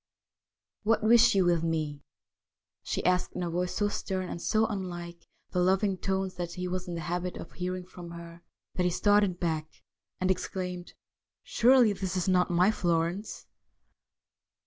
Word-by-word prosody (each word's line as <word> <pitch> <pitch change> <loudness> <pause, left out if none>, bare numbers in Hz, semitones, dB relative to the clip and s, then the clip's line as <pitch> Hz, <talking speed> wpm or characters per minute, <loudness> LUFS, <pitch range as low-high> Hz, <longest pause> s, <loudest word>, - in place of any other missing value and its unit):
' - - -64 0.3
What 220 0 +1
wish 230 -1 +6
you 190 -2 +4
with 170 -2 +3
me? 155 -3 -2 0.4
' - - -64 0.3
she - - -3
asked 180 0 +1
in 180 - -3
a 170 - -2
voice 180 +1 -2
so 205 - +1
stern 190 -2 -3
and 170 - -5
so 220 +4 +2
unlike 175 -5 -6 0.2
the 180 - 0
loving 190 +2 +2
tones 190 0 -2
that 175 -1 -4
he 180 0 -4
was 185 +1 -3
in 175 - -4
the 165 - -4
habit 175 +3 -3
of - - -9
hearing 180 0 -4
from 175 -1 -10
her, 170 0 -10 0.3
that 185 - -1
he 180 - +3
started 205 0 +2
back 160 -3 -1 0.5
and 185 0 +2
exclaimed: 180 -1 -4 0.3
' - - -64
Surely 245 -3 +4
this 190 -1 -3
is 180 - -1
not 180 -1 +3
my 180 +3 +4
Florence 175 +1 -1
180 Hz, 175 wpm, -29 LUFS, 175-190 Hz, 0.5 s, wish